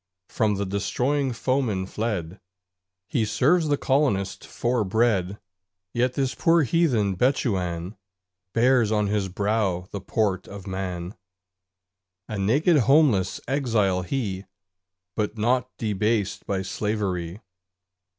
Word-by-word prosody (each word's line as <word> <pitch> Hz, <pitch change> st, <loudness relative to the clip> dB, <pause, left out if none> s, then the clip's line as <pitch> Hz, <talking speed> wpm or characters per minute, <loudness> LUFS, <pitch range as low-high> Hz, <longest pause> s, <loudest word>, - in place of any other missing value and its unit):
From 105 Hz, -3 st, +1 dB
the 100 Hz, +1 st, -2 dB
destroying 125 Hz, +8 st, 0 dB
foeman 120 Hz, -6 st, 0 dB
fled, 95 Hz, -4 st, -3 dB, 0.7 s
He 115 Hz, -, 0 dB
serves 155 Hz, +10 st, +2 dB
the 145 Hz, -1 st, +2 dB
Colonist 130 Hz, -11 st, 0 dB
for 120 Hz, -1 st, 0 dB
bread: 100 Hz, -2 st, +1 dB, 0.6 s
Yet 125 Hz, +1 st, +1 dB
this 135 Hz, -2 st, 0 dB
poor 165 Hz, -1 st, +3 dB
heathen 125 Hz, -, +2 dB
Bechuan 95 Hz, -7 st, 0 dB, 0.6 s
Bears 120 Hz, -1 st, +3 dB
on 105 Hz, -1 st, +2 dB
his 100 Hz, -1 st, -1 dB
brow 100 Hz, -2 st, -1 dB
the 100 Hz, -, -5 dB
port 100 Hz, -2 st, -1 dB
of 100 Hz, -1 st, -9 dB
man; 95 Hz, -2 st, -4 dB, 1.1 s
A 105 Hz, -, -4 dB
naked 145 Hz, -, +3 dB
homeless 130 Hz, -, +4 dB
exile 115 Hz, -9 st, +1 dB
he 100 Hz, -3 st, -3 dB, 0.7 s
But 105 Hz, +1 st, -2 dB
not 125 Hz, +3 st, +1 dB
debased 105 Hz, -1 st, -1 dB
by 95 Hz, -1 st, -1 dB
slavery. 95 Hz, -2 st, -2 dB
105 Hz, 110 wpm, -25 LUFS, 95-125 Hz, 1.1 s, homeless